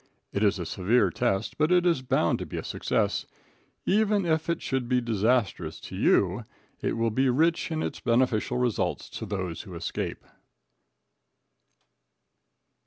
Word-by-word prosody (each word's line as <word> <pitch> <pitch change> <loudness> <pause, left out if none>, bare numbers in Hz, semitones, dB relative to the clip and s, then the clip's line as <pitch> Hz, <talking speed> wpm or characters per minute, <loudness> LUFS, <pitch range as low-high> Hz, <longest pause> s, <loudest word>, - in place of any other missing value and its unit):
It 100 - -1
is 100 -1 +3
a 90 - -4
severe 100 +9 +2
test, 110 -1 -1
but 155 +3 +3
it 180 -1 +4
is 170 -6 +3
bound 130 - +1
to - - -4
be - - -6
a - - -3
success. - - -1 0.6
Even 210 -1 +2
if 160 0 0
it 170 - +1
should 130 -2 -2
be 125 -1 +3
disastrous 115 -2 0
to - - -8
you, - - +2 0.4
it - - -1
will 115 0 +1
be 130 +4 +2
rich 165 +7 +2
in 160 -1 -2
its - - -4
beneficial 120 0 +1
results 125 -3 -1
to 110 - -6
those 95 -5 -3
who 95 -4 -10
escape. 85 - -4
125 Hz, 155 wpm, -27 LUFS, 105-160 Hz, 0.6 s, it